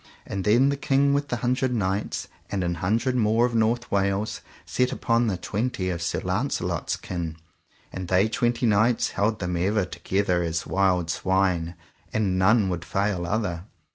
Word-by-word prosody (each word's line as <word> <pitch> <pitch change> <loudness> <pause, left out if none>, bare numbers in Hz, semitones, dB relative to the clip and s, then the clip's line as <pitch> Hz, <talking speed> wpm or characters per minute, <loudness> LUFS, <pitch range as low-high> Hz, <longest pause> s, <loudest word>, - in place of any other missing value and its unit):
And 95 - -4
then 120 +6 +5
the 140 - -1
King 140 +1 +2
with 145 0 0
the 120 - -1
Hundred 130 +1 +1
Knights 100 -1 -2 0.2
and 95 -2 -1
an 85 0 0
hundred 115 +7 +1
more 115 0 +3
of 125 - -2
North 115 +2 +1
Wales 100 +1 0 0.2
set 125 0 0
upon 115 0 +1
the 95 -4 0
twenty 100 -1 -2
of 85 -1 -4
Sir 85 - -1
Launcelot's 90 - -1
kin: 85 -3 -5 0.6
and 95 -1 -5
they 95 +4 +3
twenty 120 +2 0
knights 110 +2 +3
held 105 +2 0
them 90 -3 -3
ever 95 +3 +1
together 90 -1 0
as 80 -1 -2
wild 90 -3 +1
swine, 90 -3 0 0.4
and 95 -4 0
none 105 +2 +4
would 85 -2 -3
fail 100 -3 -1
other. 90 -4 -2
100 Hz, 170 wpm, -25 LUFS, 90-115 Hz, 0.6 s, then